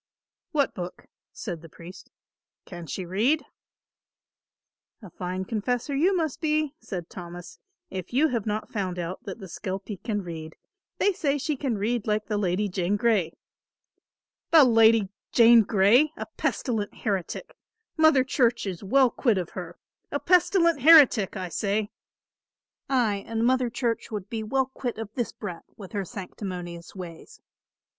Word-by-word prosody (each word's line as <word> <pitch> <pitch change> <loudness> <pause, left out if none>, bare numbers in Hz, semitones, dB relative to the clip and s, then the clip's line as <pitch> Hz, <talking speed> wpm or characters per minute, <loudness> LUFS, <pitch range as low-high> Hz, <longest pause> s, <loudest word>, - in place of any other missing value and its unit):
"What 285 -3 +1
book?" 180 -1 -7 0.3
said 175 -7 -6
the 165 - -12
priest. 170 +4 -12 0.6
"Can 175 -3 -9
she 185 +5 -4
read?" 225 - +1 1.6
"A 190 - -11
fine 185 +2 -4
confessor 245 +6 -2
you 365 +7 +3
must 315 -5 -2
be," 305 -2 +1
said 180 - -6
Thomas, 175 -1 -10 0.3
"if 185 -1 -6
you 290 +6 +3
have 230 -5 -2
not 215 +1 -3
found 185 -4 -2
out 175 +1 -4
that 195 - -6
the 200 - -9
skelpie 190 +4 -5
can 210 -4 -2
read. 160 -2 -7 0.4
They 405 - +2
say 290 -5 0
she 290 +2 -2
can 255 -5 -2
read 220 +2 -1
like 210 0 0
the 210 -2 -1
Lady 195 +1 0
Jane 185 +1 -1
Grey." 205 -7 +1 1.2
"The 320 -3 +8
Lady 225 -4 +5 0.2
Jane 235 -1 +7
Grey, 220 +8 +4
a - - -4
pestilent 220 -5 -2
heretic! 200 - -3 0.4
Mother 315 -5 +5
Church 245 -3 +1
is 185 -2 -5
well 255 +5 +4
quit 230 -5 +1
of 180 -3 -3
her; - - -7 0.3
a - - -1
pestilent 340 -4 +3
heretic, 270 - +6
I 185 -1 -4
say! 205 +3 -1 1.0
Ay, 220 -7 +1
and 225 0 -1
Mother 255 0 +2
Church 235 -1 -2
would 205 -3 -6
be 225 -1 -2
well 265 +5 +1
quit 255 -2 -5
of 220 -1 -6
this 240 -3 -2
brat 180 -5 -7
with 195 -3 -10
her 200 -3 -2
sanctimonious 180 -4 -7
ways." 180 - -10
215 Hz, 150 wpm, -26 LUFS, 185-255 Hz, 1.6 s, The